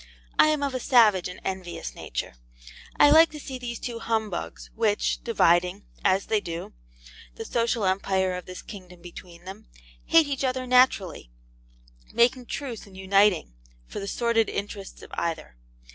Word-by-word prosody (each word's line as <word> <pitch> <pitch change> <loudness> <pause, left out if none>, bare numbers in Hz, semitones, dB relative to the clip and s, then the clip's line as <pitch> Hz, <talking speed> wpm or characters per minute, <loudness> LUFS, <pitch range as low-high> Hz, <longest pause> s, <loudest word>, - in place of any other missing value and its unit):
I - - +7
am 305 -2 +1
of 280 -2 -1
a 255 - -2
savage 220 -8 +4
and 180 - -9
envious 180 - -5
nature, - - -5 0.7
I 290 - +7
like 320 +2 +7
to 300 - -7
see 265 -2 -7
these 240 -1 -5
two 235 0 -6
humbugs 220 -5 -3
which, 220 -2 0
dividing, 180 -3 +2 0.2
as 190 +1 +2
they 215 -2 +1
do, 170 -1 -6 0.6
the - - -7
social 230 -2 0
empire 190 0 +1
of 180 -1 -6
this 185 0 -9
kingdom 180 -4 -12
between 175 0 -12
them, 200 +3 -10 0.4
hate 330 -1 +5
each 280 -1 -3
other 255 -1 -1
naturally, 250 - +2 0.8
making 245 +1 +2
truce 245 -7 -6
and 190 -1 -15
uniting, 190 - +2 0.3
for - - -7
the 200 - -6
sordid 230 +1 +1
interests 200 -1 -6
of - - -13
either. 165 - -4
205 Hz, 160 wpm, -26 LUFS, 185-245 Hz, 0.8 s, I